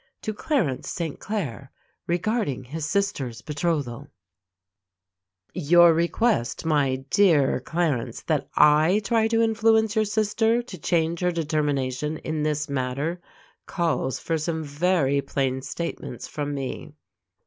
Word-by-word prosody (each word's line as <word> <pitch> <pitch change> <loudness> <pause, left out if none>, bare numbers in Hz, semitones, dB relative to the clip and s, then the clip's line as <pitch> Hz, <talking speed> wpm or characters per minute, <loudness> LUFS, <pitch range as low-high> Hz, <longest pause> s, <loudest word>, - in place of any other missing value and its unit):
To 215 - -2
Clarence 210 - -1
St. 165 -4 -4
Claire 145 - -4 0.4
Regarding 175 - -1
His 150 +5 -5
Sister's 140 - -2
Betrothal 145 -4 -2 1.5
Your 175 0 +6
request, 170 - 0
my 135 -4 +1
dear 160 -11 +4
Clarence, 155 -4 -2
that - - -1
I 155 +7 +5
try 225 -1 +2
to 225 0 +2
influence 220 -1 +3
your 215 0 +3
sister 220 +3 +1
to 205 -6 -9
change 165 +1 0
her 180 -1 +1
determination 150 -3 -1
in 155 -1 -3
this 150 0 -1
matter, 140 +6 -2 0.5
calls 145 -7 -1
for 165 +3 -2
some 160 +1 -2
very 145 -2 +1
plain 135 -1 -1
statements 170 +5 -5
from 145 -1 -4
me. 140 +2 -5
160 Hz, 120 wpm, -25 LUFS, 140-185 Hz, 1.5 s, Your